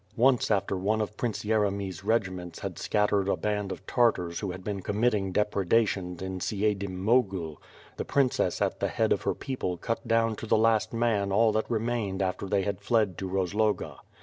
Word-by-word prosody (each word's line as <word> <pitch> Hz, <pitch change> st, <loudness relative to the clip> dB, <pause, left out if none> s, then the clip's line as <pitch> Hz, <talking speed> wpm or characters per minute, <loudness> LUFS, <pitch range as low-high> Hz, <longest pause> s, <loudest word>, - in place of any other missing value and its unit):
Once 125 Hz, +1 st, +4 dB
after 100 Hz, -2 st, +1 dB
one 100 Hz, +4 st, 0 dB
of 105 Hz, 0 st, -3 dB
Prince 115 Hz, -1 st, -3 dB
Yeremy's 100 Hz, -4 st, 0 dB
regiments 95 Hz, -6 st, -1 dB
had -, -, -5 dB
scattered 105 Hz, -2 st, +1 dB
a -, -, +1 dB
band 105 Hz, -2 st, -2 dB
of -, -, -7 dB
Tartars 100 Hz, -9 st, +1 dB
who 100 Hz, -, -3 dB
had 90 Hz, +1 st, -6 dB
been 100 Hz, -1 st, -3 dB
committing 105 Hz, -1 st, 0 dB
depredations 100 Hz, -2 st, +1 dB
in 95 Hz, 0 st, -4 dB
Siedm 100 Hz, -2 st, -1 dB
Mogil, 95 Hz, -, +1 dB, 0.4 s
the -, -, -2 dB
princess 135 Hz, -3 st, +1 dB
at -, -, -1 dB
the -, -, +1 dB
head -, -, +1 dB
of -, -, -2 dB
her -, -, -1 dB
people 125 Hz, -10 st, -3 dB
cut 115 Hz, +7 st, -3 dB
down 115 Hz, -1 st, +2 dB
to 115 Hz, -, -6 dB
the -, -, +4 dB
last 110 Hz, 0 st, +3 dB
man 115 Hz, -4 st, +1 dB
all 110 Hz, +3 st, +4 dB
that 110 Hz, +1 st, -1 dB
remained 115 Hz, -4 st, -1 dB
after 95 Hz, +1 st, -2 dB
they 100 Hz, 0 st, +1 dB
had 100 Hz, 0 st, -3 dB
fled 105 Hz, -3 st, +1 dB
to 95 Hz, -, -3 dB
Roz 95 Hz, 0 st, -1 dB
loga. 105 Hz, 0 st, 0 dB
105 Hz, 190 wpm, -28 LUFS, 95-115 Hz, 0.4 s, Once